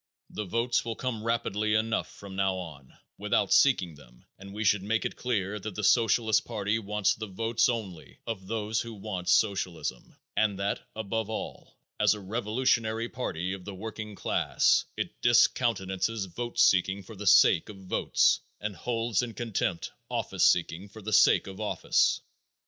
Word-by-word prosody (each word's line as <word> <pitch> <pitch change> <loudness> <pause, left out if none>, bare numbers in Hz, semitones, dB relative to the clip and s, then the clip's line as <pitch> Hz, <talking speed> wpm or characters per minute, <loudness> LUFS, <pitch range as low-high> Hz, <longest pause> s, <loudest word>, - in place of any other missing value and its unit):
The 105 - -4
votes 115 +5 0
will 115 -1 -4
come 115 -4 -4
rapidly 110 -2 0
enough 110 +1 0
from 100 -1 -11
now 95 -1 +1
on 75 -8 -9 0.2
without 105 -1 +1
seeking 95 - +4
them - - -18
and 100 +1 -10
we 105 +2 -4
should 105 -1 +3
make 110 +3 -1
it - - -3
clear 105 -4 -2
that 105 -1 -7
the 105 - -4
Socialist 110 +1 +3
party 105 -1 -1
wants 105 -2 +1
the 110 0 -6
votes 115 +4 +1
only 100 -9 -5
of 100 -5 -5
those 110 0 -1
who 115 -1 -7
want 95 -3 -5
socialism, 95 - 0 0.2
and 105 -3 +1
that, 100 +1 -1 0.2
above 110 0 -3
all, 110 - -6 0.2
as 105 0 +4
a - - -8
revolutionary 115 +2 0
party 90 -7 -3
of 95 -2 -8
the 100 0 -7
working 105 +1 -7
class, - - +2
it - - -5
discountenances 115 -3 +2
vote 120 +7 -6
seeking 95 -4 +3
for 110 +4 -11
the 100 +1 -6
sake 85 - +6
of 105 - -9
votes 95 -1 +2 0.2
and 105 -1 -4
holds 115 -1 -1
in 120 -2 -5
contempt 100 -7 -2 0.2
office - - -1
seeking 90 +3 +1
for 110 +1 -12
the 110 +1 -3
sake 105 - +5
of 95 +1 -8
office. 105 - +1
105 Hz, 165 wpm, -28 LUFS, 95-115 Hz, 0.2 s, sake